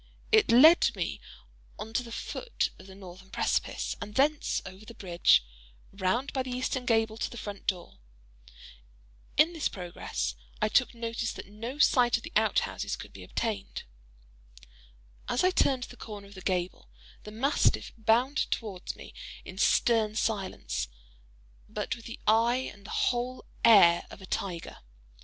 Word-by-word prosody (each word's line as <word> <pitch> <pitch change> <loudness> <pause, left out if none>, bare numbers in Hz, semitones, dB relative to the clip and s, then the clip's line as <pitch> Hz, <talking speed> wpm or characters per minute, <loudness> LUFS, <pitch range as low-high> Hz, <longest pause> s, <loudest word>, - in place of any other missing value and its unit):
It 435 - +5
led 310 +9 +7
me - - -3 0.6
on 220 +1 -7
to 245 - +1
the 235 -1 -10
foot 475 - -3
of 185 - -13
the 190 - -12
northern 190 0 -12
precipice, - - -1
and 205 +1 -7
thence 290 +2 +2
over 190 +2 -10
the 230 +2 -12
bridge, 175 - +3 0.5
round 200 +7 -1
by 265 - 0
the 255 - -5
eastern 250 0 -2
gable 225 -1 +2
to - - -2
the 240 - -10
front 205 -2 -7
door. 180 - -3 1.4
In 310 +4 +5
this 320 -3 0
progress, 180 -3 -4 0.3
I 215 - +1
took 250 +1 +2
notice 230 0 -3
that - - -8
no 230 +7 -7
sight 250 -4 +4
of - - -11
the - - -9
out - - +3
houses - - -3
could - - -11
be - - -10
obtained. 210 -4 -3 1.5
As 245 - +1
I 370 - +4
turned 265 -7 +2
the 245 - -10
corner 210 -2 -8
of 200 - -14
the 190 - -10
gable, 180 - -2 0.3
the - - -10
mastiff 265 +7 +1
bounded 235 +6 +2
towards 200 -5 -4
me - - -12 0.3
in - - -9
stern 220 -3 +3
silence, 190 - -2 0.8
but - - -3
with 230 - -14
the 230 - -8
eye 235 +4 +3
and 200 -1 -15
the - - -11
whole 250 +1 -1 0.2
air 185 -7 +7
of - - -11
a 190 - -10
tiger. 180 -3 -4
225 Hz, 160 wpm, -29 LUFS, 195-250 Hz, 1.5 s, led